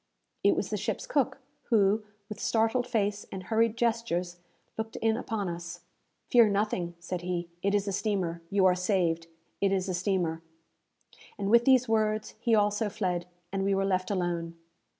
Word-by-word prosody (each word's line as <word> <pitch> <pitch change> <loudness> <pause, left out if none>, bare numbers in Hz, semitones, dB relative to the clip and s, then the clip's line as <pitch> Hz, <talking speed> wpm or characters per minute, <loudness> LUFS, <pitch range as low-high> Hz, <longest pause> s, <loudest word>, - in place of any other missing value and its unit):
It - - +5
was - - -2
the - - 0
ship's - - -3
cook, 275 - +1 0.3
who, 210 -2 +3 0.2
with 210 - -7
startled 225 +2 +1
face 205 -3 -1
and 190 -1 -6
hurried 225 +2 +1
gestures, 225 -7 0 0.4
looked 220 0 -5
in 225 0 +1
upon 220 -4 -3
us. 170 0 -6 0.5
"Fear 235 -4 +7
nothing," 200 -4 -1
said 175 +1 -4
he. 175 -1 -3
"It 200 +1 +1
is 205 0 0
a - - 0
steamer! 185 -5 -1
You 195 -1 +3
are 185 - +6
saved! 180 -3 0 0.3
It 195 -1 +3
is 190 -1 0
a 185 - -1
steamer!" 175 -3 0 1.0
And 200 0 -1
with 235 0 +6
these 255 -2 +5
words 215 -1 0
he 230 0 +3
also 210 +1 +2
fled, 180 -3 -2 0.3
and 195 0 0
we 195 0 +2
were 195 0 +1
left 185 -1 0
alone. 175 -3 -2
200 Hz, 170 wpm, -29 LUFS, 180-220 Hz, 1.0 s, Fear